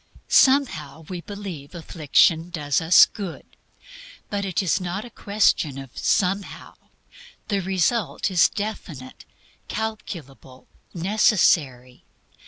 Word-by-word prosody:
"Somehow" 260 - +3
we 180 -2 -5
believe 185 -7 -8
affliction 165 0 +2
does 150 -4 -1
us 165 +2 +7
good. 195 -6 -8 0.9
But 200 -1 -2
it 190 0 -1
is 185 - 0
not 185 +5 -4
a 240 - -12
question 200 -10 +1
of 135 -2 -10
"Somehow." 195 +1 -1 0.8
The 200 -2 0
result 190 +4 -1
is 180 - +4
definite, 170 -11 -7 0.4
calculable, 170 -12 -7 0.3
necessary. 165 - +1
180 Hz, 100 wpm, -23 LUFS, 155-205 Hz, 0.9 s, us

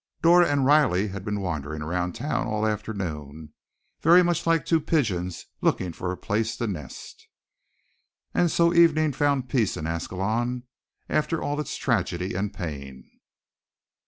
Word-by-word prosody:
Dora 175 +1 +6
and 140 -2 +2
Riley 130 -9 +4
had 95 0 -6
been 105 -1 -2
wandering 75 -4 -4
around 90 +2 -2
town 140 +6 -2
all 110 -1 -1
afternoon, 80 -9 -4 0.5
very 175 +3 +7
much 175 -1 0
like 165 -4 +2
two 165 -2 +2
pigeons 100 - -1 0.2
looking 90 -2 0
for 90 +2 -4
a 90 - -5
place 110 +4 -1
to 120 - -2
nest. 85 - -7 1.1
And 175 - +3
so 170 +1 +3
evening 155 -3 +4
found 140 -2 +1
peace 115 -5 0
in 75 - -4
Ascalon, 110 +9 -2 0.4
after 155 +1 0
all 145 +1 -2
its 150 - -5
tragedy 95 -6 -1
and 100 +3 -2
pain. 70 -9 -7
110 Hz, 145 wpm, -25 LUFS, 90-145 Hz, 1.1 s, very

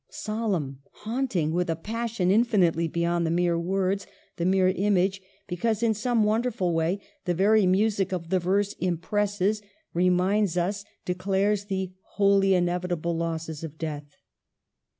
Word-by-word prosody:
Solemn, 195 -12 -3 0.3
haunting 220 - 0
with 180 0 0
a 165 - +1
passion 220 +1 -1
infinitely 195 -7 +3
beyond 170 +1 0
the 165 - 0
mere 170 0 +1
words, 190 +2 -1 0.3
the 170 - -1
mere 185 0 +4
image; 195 0 +1 0.3
be 180 - -3
cause, 225 +4 0
in 225 -1 +3
some 225 +1 +1
wonderful 215 -4 0
way, 165 +4 0 0.3
the 175 -1 0
very 205 +2 +4
music 195 0 +2
of 170 -3 -4
the 185 - +3
verse 200 +3 +1
impresses, 205 +4 0 0.3
reminds 180 +2 +2
us, 200 +4 -1 0.2
declares 195 +3 0
the 190 -2 -3 0.3
holy 195 -1 +4
inevitable 175 -1 -1
losses 165 -1 -3
of 160 -1 -7
death. 150 -3 -6
185 Hz, 140 wpm, -26 LUFS, 170-205 Hz, 0.3 s, mere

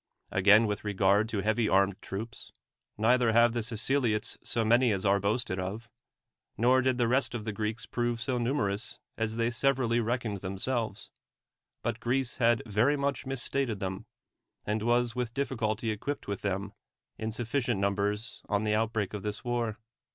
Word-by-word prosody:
Again, 100 +4 +6
with 105 -1 -2
regard 100 +1 +2
to 105 -3 -1
heavy 110 +2 +1
armed 95 0 +2
troops, 110 +4 -7 0.5
neither 115 +1 +3
have 115 0 +5
the 120 - -1
Siceliots 115 0 0
so 115 -2 0
many 120 +2 +4
as 95 0 -1
are 100 0 +4
boasted 100 -1 0
of, 105 +6 -5 0.7
nor 125 +3 +4
did 130 -1 +1
the 120 -2 +2
rest 125 +1 +1
of 110 -3 -4
the 110 - -2
G 110 - -8
reeks 110 +1 -2
prove 120 -1 -1
so 125 0 -1
numer 120 -5 +1
ous 110 +4 -4 0.2
as 110 0 -2
they 115 +1 +1
severally 120 -1 +2
reckoned 115 -2 -1
themselves; 100 +3 -3 0.7
but - - -2
Greece 125 +1 -1
had 120 -2 +3
very 115 +7 +2
much 140 -1 -2
misstated 135 -3 -1
them, 95 -1 -4 0.6
and 105 +1 -1
was 120 +1 +1
with 125 -1 -3
difficulty 115 -5 -1
equipped 140 +7 -4
with 100 -1 -3
them 100 0 -2 0.5
in 110 0 -2
sufficient 120 0 -1
numbers 100 +3 -1
on 105 0 +1
the 105 -1 +1
outbreak 110 -2 0
of 105 - -4
this 105 0 -4
war. 120 -3 -1
110 Hz, 170 wpm, -29 LUFS, 105-120 Hz, 0.7 s, Again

